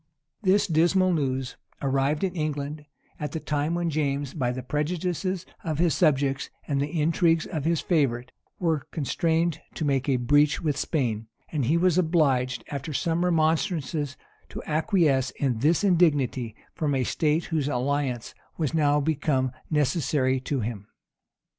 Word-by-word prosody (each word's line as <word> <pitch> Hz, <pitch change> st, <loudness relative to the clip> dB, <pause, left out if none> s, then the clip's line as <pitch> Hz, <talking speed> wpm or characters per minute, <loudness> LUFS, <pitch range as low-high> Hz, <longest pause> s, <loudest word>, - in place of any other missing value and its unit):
This 200 Hz, 0 st, +3 dB
dismal 180 Hz, +3 st, +3 dB
news 135 Hz, -4 st, -1 dB, 0.2 s
arrived 140 Hz, +3 st, 0 dB
in 185 Hz, -2 st, -1 dB
England 150 Hz, -1 st, -3 dB, 0.3 s
at 150 Hz, -, -4 dB
the 160 Hz, -, -2 dB
time 150 Hz, +2 st, -1 dB
when 170 Hz, -1 st, -1 dB
James, 140 Hz, -2 st, -1 dB
by 125 Hz, -6 st, -1 dB
the 130 Hz, 0 st, -5 dB
prejudices 180 Hz, +4 st, -2 dB, 0.2 s
of 155 Hz, -4 st, -2 dB
his 170 Hz, 0 st, +3 dB
subjects 140 Hz, -4 st, +1 dB, 0.2 s
and 140 Hz, -2 st, 0 dB
the 150 Hz, +3 st, -2 dB
intrigues 165 Hz, +1 st, +2 dB
of 155 Hz, -3 st, -4 dB
his 165 Hz, -1 st, +1 dB
favorite, 125 Hz, -8 st, 0 dB, 0.3 s
was 160 Hz, -5 st, +1 dB
constrained 165 Hz, +1 st, 0 dB
to 160 Hz, -, -2 dB
make 135 Hz, -1 st, +1 dB
a 135 Hz, -, +3 dB
breach 145 Hz, +4 st, +3 dB
with 150 Hz, -3 st, 0 dB
Spain: 115 Hz, -8 st, -1 dB, 0.2 s
and 145 Hz, -6 st, 0 dB
he 155 Hz, +7 st, +3 dB
was 180 Hz, 0 st, +3 dB
obliged, 140 Hz, -7 st, +2 dB
after 145 Hz, +2 st, -4 dB
some 165 Hz, +4 st, 0 dB
remonstrances, 160 Hz, -3 st, 0 dB, 0.3 s
to -, -, -7 dB
acquiesce 155 Hz, -, +2 dB
in 130 Hz, -5 st, 0 dB
this 155 Hz, -, +2 dB
indignity 145 Hz, -, +2 dB, 0.2 s
from 145 Hz, -3 st, -1 dB
a 130 Hz, -, +1 dB
state 155 Hz, +5 st, +1 dB
whose 155 Hz, -4 st, -1 dB
alliance 135 Hz, -2 st, -1 dB, 0.2 s
was 155 Hz, -3 st, -1 dB
now 150 Hz, -2 st, +3 dB
become 140 Hz, -3 st, 0 dB, 0.2 s
necessary 145 Hz, -3 st, +1 dB
to 130 Hz, 0 st, -2 dB
him. 105 Hz, -2 st, -5 dB
150 Hz, 150 wpm, -26 LUFS, 135-165 Hz, 0.3 s, This